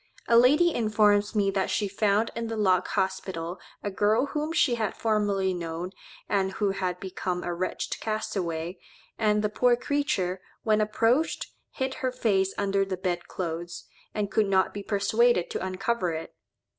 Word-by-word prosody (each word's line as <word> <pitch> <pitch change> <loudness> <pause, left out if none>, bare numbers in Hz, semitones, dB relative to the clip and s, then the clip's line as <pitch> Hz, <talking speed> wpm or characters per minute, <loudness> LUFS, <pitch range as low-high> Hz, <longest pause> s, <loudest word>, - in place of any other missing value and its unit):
A 235 - +4
lady 295 +8 +6
informs 210 -2 +2
me 200 -2 +2
that 195 -1 0
she 205 - 0
found 205 +2 +1
in 230 0 -3
the 225 0 -4
Lock 185 -4 +3
Hospital 190 -2 -2 0.2
a 205 - -2
girl 215 +6 +2
whom 300 +2 -3
she 330 -7 +3
had 220 -3 -2
formerly 205 -4 +1
known, 170 +1 -4 0.4
and 195 -1 0
who 200 0 0
had 185 -2 -2
become 180 -1 -3
a 175 - -2
wretched 180 +2 -3
castaway, 185 -6 -3 0.4
and 210 -1 +2
the - - +3
poor 245 +3 +3
creature, 240 -10 -1 0.2
when 215 -1 +3
approached, 230 +8 +1 0.2
hid 265 -1 -3
her 255 -1 0
face 200 -6 +1
under 195 0 +1
the 190 -1 -3
bed 180 -2 -2
clothes, 170 -1 -5 0.3
and 205 -1 -2
could 215 -2 +2
not 190 -1 +2
be 205 - -5
persuaded 205 0 +2
to - - -3
uncover 190 0 -1
it. 160 0 -6
205 Hz, 165 wpm, -27 LUFS, 185-225 Hz, 0.4 s, lady